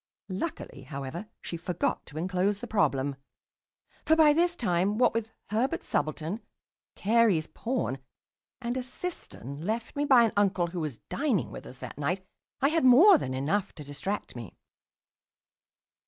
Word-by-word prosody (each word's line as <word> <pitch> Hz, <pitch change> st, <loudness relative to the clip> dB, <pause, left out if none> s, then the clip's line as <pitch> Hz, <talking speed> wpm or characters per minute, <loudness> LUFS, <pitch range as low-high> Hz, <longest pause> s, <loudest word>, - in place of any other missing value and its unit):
Luckily, 190 Hz, -, -5 dB
however, 140 Hz, +7 st, -6 dB, 0.2 s
she 170 Hz, -, -4 dB
forgot 175 Hz, +1 st, -2 dB
to 150 Hz, -, -10 dB
enclose 185 Hz, +4 st, 0 dB
the -, -, -5 dB
problem. 140 Hz, -, +1 dB, 0.9 s
For 320 Hz, -, +4 dB
by 310 Hz, -2 st, +6 dB
this 345 Hz, +2 st, +2 dB
time, 200 Hz, -, +1 dB
what 245 Hz, -, +4 dB
with 225 Hz, -1 st, -2 dB, 0.2 s
Herbert's 255 Hz, +10 st, 0 dB
subaltern, 155 Hz, +7 st, -2 dB, 0.5 s
Carey's 210 Hz, -6 st, +3 dB
pawn, 230 Hz, -, -2 dB, 0.6 s
and 240 Hz, -1 st, -3 dB
a -, -, 0 dB
cistern 245 Hz, -, -7 dB
left 225 Hz, +5 st, -3 dB
me 290 Hz, 0 st, 0 dB
by 260 Hz, -4 st, +7 dB
an 225 Hz, -, +1 dB
uncle 195 Hz, -3 st, +2 dB
who 170 Hz, +1 st, -5 dB
was 150 Hz, -7 st, -3 dB
dining 270 Hz, -, 0 dB
with -, -, -9 dB
us 130 Hz, -, -10 dB
that 125 Hz, +2 st, -8 dB
night, 180 Hz, +6 st, -1 dB, 0.4 s
I 275 Hz, -, +4 dB
had 325 Hz, -1 st, +1 dB
more 305 Hz, +9 st, +8 dB
than 130 Hz, -, -3 dB
enough 185 Hz, +10 st, 0 dB
to 150 Hz, -, -9 dB
distract 145 Hz, +8 st, -4 dB
me. 115 Hz, -6 st, -9 dB
195 Hz, 155 wpm, -28 LUFS, 155-245 Hz, 0.9 s, more